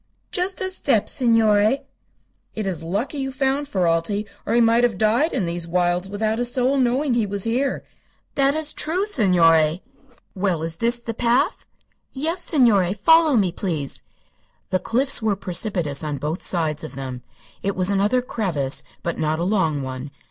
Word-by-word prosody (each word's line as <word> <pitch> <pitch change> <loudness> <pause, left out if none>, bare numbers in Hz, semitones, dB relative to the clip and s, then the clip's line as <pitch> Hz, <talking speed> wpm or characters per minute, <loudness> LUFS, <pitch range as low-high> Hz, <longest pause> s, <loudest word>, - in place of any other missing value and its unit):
"Just 370 +2 -1
a 375 0 0
step, 265 - +1
signore." 225 +1 +2 0.7
"It 215 - -3
is 185 -5 -2
lucky 205 - -3
you 270 0 -3
found 270 +1 -1
Ferralti, 185 +1 0 0.2
or - - +1
he - - +4
might 230 +1 +4
have 240 -2 +1
died 230 +9 +2
in 185 - -1
these 170 0 -3
wilds 175 +1 0
without 215 +2 -1
a - - +1
soul 250 +3 +1
knowing 260 +2 +1
he 230 -3 +1
was 200 -1 -2
here." 250 +5 -1 0.5
"That 275 +1 +2
is 310 -1 +1
true, 355 +6 0
signore." 170 - +3 0.5
"Well, 185 -5 -1
is 165 0 -3
this 235 +1 0
the 230 -1 -5
path?" 240 +1 0 0.5
"Yes, 325 +6 -2
signore. 210 - +2
Follow 320 +6 +4
me, 195 -6 +2
please." 165 -6 -3 0.7
The 185 - +2
cliffs 255 +6 +1
were 215 -2 +1
precipitous 175 -6 -1
on 150 -2 -3
both 155 +5 -4
sides 160 -4 0
of 130 - -8
them. 130 -2 -6 0.4
It 200 0 -2
was 185 +1 +2
another 205 +6 +1
crevasse, 165 - 0 0.2
but 170 - -3
not 155 0 0
a 170 - -2
long 165 -7 0
one. 130 +1 -6
210 Hz, 170 wpm, -22 LUFS, 170-250 Hz, 0.7 s, he